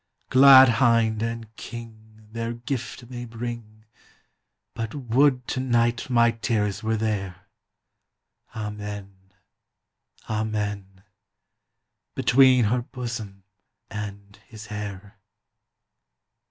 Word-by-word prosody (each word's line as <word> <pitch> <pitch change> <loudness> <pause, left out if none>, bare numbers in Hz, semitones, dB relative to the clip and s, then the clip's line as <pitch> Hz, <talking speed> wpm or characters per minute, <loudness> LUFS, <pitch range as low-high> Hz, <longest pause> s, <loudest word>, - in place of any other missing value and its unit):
Glad 130 -2 +8
Hinde 115 -3 +3
and 115 -1 -5
King 110 -2 -11
Their 115 +1 -4
Gyfte 120 0 -5
may 120 0 -7
bring 115 -2 -7 0.9
But 115 +2 -5
wo'd 130 0 +2
to - - -2
night 120 -1 +1
my 115 -1 +4
Teares 110 -3 -1
were 110 0 -1
there, 95 -4 -3 1.1
Amen, 105 -3 -7 1.0
Amen: 105 -3 -3 1.1
Between 130 -2 +5
her 120 +4 +1
Bosom 115 -6 -7 0.5
and 100 -1 -7
His 110 -1 -11
hayre! 105 0 -7
110 Hz, 85 wpm, -24 LUFS, 105-120 Hz, 1.1 s, Glad